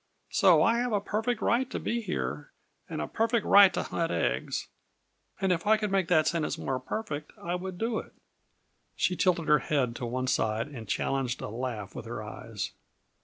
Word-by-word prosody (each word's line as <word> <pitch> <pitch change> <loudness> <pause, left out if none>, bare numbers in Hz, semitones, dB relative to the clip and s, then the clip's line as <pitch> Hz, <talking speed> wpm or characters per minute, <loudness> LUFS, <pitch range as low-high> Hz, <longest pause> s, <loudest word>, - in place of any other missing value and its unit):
So 180 -6 +5
I 230 +6 +3
have 245 -1 0
a 205 - +3
perfect 220 +3 -1
right 250 +2 +2
to - - -3
be 235 0 -1
here, - - -3 0.4
and - - -4
a - - -4
perfect 230 0 +1
right 200 -1 +8
to - - 0
hunt 165 -1 -2
eggs; - - -1 0.7
and 190 -1 +1
if 175 +2 0
I 220 +1 +6
could 210 -2 -2
make 190 -3 +2
that 160 -3 +4
sentence 165 -2 0
more 130 -1 -2
'perfect,' 150 0 -4
I 170 - -3
would 180 0 -4
do 225 +2 -1
it." - - -11 0.8
She 180 - +1
tilted 175 -3 +2
her 150 -1 +6
head 130 -4 0
to 120 - -4
one 130 +2 -2
side 110 0 0
and 120 -7 -8
challenged 130 -2 -1
a - - -4
laugh 115 -3 -4
with 115 - -7
her 115 -2 -5
eyes. 105 -3 -6
170 Hz, 195 wpm, -29 LUFS, 130-210 Hz, 0.8 s, right